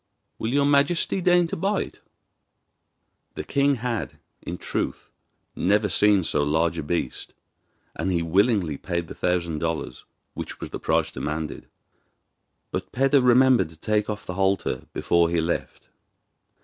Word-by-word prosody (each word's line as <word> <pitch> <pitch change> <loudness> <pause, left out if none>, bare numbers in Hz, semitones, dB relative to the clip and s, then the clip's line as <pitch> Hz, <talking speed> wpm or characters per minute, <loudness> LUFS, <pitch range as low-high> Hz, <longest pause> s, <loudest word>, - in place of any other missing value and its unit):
Will 110 - -2
your 140 +1 +3
majesty 145 +6 +2
deign 175 0 +4
to 165 - -4
buy 195 +4 0
it?' - - -13 1.3
The - - -4
king 140 0 +2
had, 120 -2 -3 0.2
in 85 - -6
truth, - - -3 0.4
never 105 +3 +2
seen 105 0 +4
so 75 -2 0
large 80 +3 +1
a - - -1
beast, 75 -3 -3 0.6
and 90 +5 -1
he 85 -2 +1
willingly 95 - +2
paid 85 +1 -3
the - - -8
thousand 85 -3 -1
dollars, 80 -6 -3 0.3
which - - -7
was - - -7
the - - -5
price - - +1
demanded; 75 +1 -4 1.0
but - - -4
Peder 135 +2 +3
remembered 125 -5 +5
to 80 - -15
take 105 +4 0
off 105 0 -4
the 90 - -5
halter 95 -8 0
before 85 -1 +2
he 85 0 +1
left. 85 +1 -3
95 Hz, 150 wpm, -24 LUFS, 85-125 Hz, 1.3 s, remembered